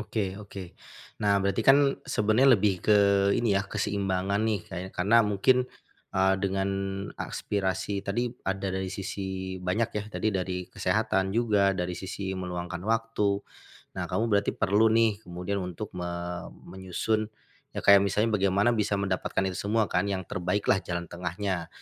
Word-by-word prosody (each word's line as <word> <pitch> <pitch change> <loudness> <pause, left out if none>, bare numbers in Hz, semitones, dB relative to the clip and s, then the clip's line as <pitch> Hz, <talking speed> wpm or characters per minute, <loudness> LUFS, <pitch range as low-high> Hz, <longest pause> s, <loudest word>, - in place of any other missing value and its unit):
Oke 105 -3 -2
oke. 100 -3 -9 0.5
Nah 100 -1 +3
berarti 100 +3 0
kan 140 0 +5
sebenernya 115 +3 +4
lebih 95 -2 +1
ke 105 - +4 0.4
ini 115 -3 +1
ya 100 - 0
keseimbangan 100 -1 -1
nih, 110 -2 +1
kayak 95 +1 -6
karena 105 +6 +5
mungkin, 120 +5 +2 0.5
eee, 95 0 +4
dengan 95 0 0 0.5
aspirasi 100 0 -2
tadi 120 +5 -2 0.2
ada 95 0 -2
dari 95 0 -2
sisi 95 -1 -4
banyak 95 +6 0
ya 105 - -2
tadi 110 - -1
dari 90 -1 -2
kesehatan 95 0 +1
juga 100 -4 +3
dari 90 -1 -2
sisi 95 +1 -5
meluangkan 90 -1 -4
waktu, 110 -3 0 0.5
nah - - -4
kamu 110 - +1
berarti 100 0 +3
perlu 105 +3 +3
nih 110 -2 +3
kemudian 90 +3 -4
untuk 90 +3 -6
me 90 -1 -4 0.6
menyusun, 95 +4 -2 0.5
ya - - -4
kayak 100 -1 +8
misalnya 105 +3 +1
bagaimana 100 +5 +3
bisa 105 -2 0
mendapatkan 95 -1 -1
itu 95 -1 -3
semua 110 0 +3
kan 100 - +1
yang 95 -2 -2
terbaik 90 +4 -2
lah 95 - +3
jalan 85 -1 -4
tengahnya, 90 0 -3
100 Hz, 150 wpm, -28 LUFS, 95-105 Hz, 0.6 s, kayak